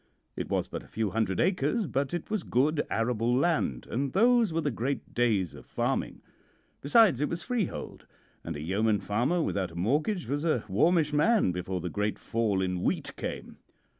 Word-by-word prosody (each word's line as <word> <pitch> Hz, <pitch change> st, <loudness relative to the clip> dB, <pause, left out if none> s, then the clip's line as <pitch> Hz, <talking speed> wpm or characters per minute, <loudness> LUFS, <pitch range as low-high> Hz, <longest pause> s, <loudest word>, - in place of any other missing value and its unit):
It -, -, -4 dB
was -, -, 0 dB
but -, -, -6 dB
a -, -, -16 dB
few 110 Hz, -3 st, -2 dB
hundred 110 Hz, -3 st, 0 dB
acres, 185 Hz, -, +1 dB
but 140 Hz, -3 st, -1 dB
it 175 Hz, +3 st, -4 dB
was 215 Hz, -3 st, 0 dB
good 150 Hz, +2 st, +1 dB
arable 115 Hz, +1 st, +1 dB
land, 140 Hz, -, 0 dB
and 135 Hz, +3 st, -2 dB
those 235 Hz, 0 st, +4 dB
were 165 Hz, +1 st, 0 dB
the 145 Hz, -, -1 dB
great 125 Hz, +4 st, -3 dB
days 105 Hz, -8 st, +1 dB
of -, -, -11 dB
farming. -, -, -2 dB, 0.6 s
Besides, 165 Hz, -, +5 dB
it 150 Hz, -, +1 dB
was 170 Hz, 0 st, -4 dB
freehold, 240 Hz, -6 st, -3 dB, 0.4 s
and 80 Hz, -, -5 dB
a 75 Hz, -, -5 dB
yeoman 105 Hz, +6 st, +1 dB
farmer 120 Hz, -, 0 dB
without 95 Hz, -9 st, -1 dB
a 85 Hz, -, -14 dB
mortgage 150 Hz, -, 0 dB
was 145 Hz, +2 st, -2 dB
a 155 Hz, -9 st, +1 dB
warmish 155 Hz, -, +2 dB
man 195 Hz, -, +3 dB
before 90 Hz, +1 st, -3 dB
the 90 Hz, -, -3 dB
great 105 Hz, 0 st, -1 dB
fall 105 Hz, -4 st, 0 dB
in 90 Hz, -1 st, -2 dB
wheat -, -, -1 dB
came. -, -, -6 dB
130 Hz, 185 wpm, -29 LUFS, 105-165 Hz, 0.6 s, Besides